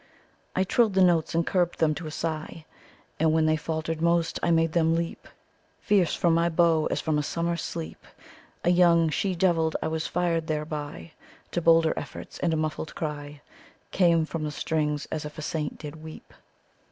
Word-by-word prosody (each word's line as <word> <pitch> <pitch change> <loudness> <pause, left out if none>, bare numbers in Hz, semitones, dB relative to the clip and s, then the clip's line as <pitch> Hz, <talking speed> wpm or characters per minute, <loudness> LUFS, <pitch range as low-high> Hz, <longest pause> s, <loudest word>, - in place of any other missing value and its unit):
"I 190 - +3
trill'd 215 +1 +2
the 190 - +5
notes, 170 -3 +2
and 165 0 +2
curb'd 175 -2 0
them 155 -2 +2
to 160 +1 -6
a - - -4
sigh, 155 0 -5 0.5
And 160 0 +3
when 160 0 +3
they 155 0 +3
falter'd 160 +1 -3
most, 170 0 +1
I - - +1
made 165 -1 +3
them 165 -1 +3
leap 165 0 -4 0.5
Fierce 190 -6 +2
from 170 -1 +2
my 170 +1 +2
bow, 165 -1 +3
as - - -1
from 155 -2 0
a - - +1
summer 170 +3 -1
sleep 165 -1 -6 0.6
A 175 - +3
young 170 -2 +5
she 185 +4 -1
devil. 165 -3 +2
I - - -2
was 160 0 -2
fired 170 -2 0
thereby 150 - -4 0.4
To 175 - -1
bolder 165 -1 +4
efforts - - -8
and 170 - +1
a 160 - 0
muffled 155 0 -3
cry 145 -2 -5 0.5
Came 170 -3 +3
from 160 0 -5
the 150 - -2
strings 150 -1 -1
as 155 - -3
if 150 0 -8
a 155 - -5
saint 150 -1 -3
did 150 0 -8
weep. 160 0 -11
160 Hz, 190 wpm, -26 LUFS, 155-170 Hz, 0.6 s, the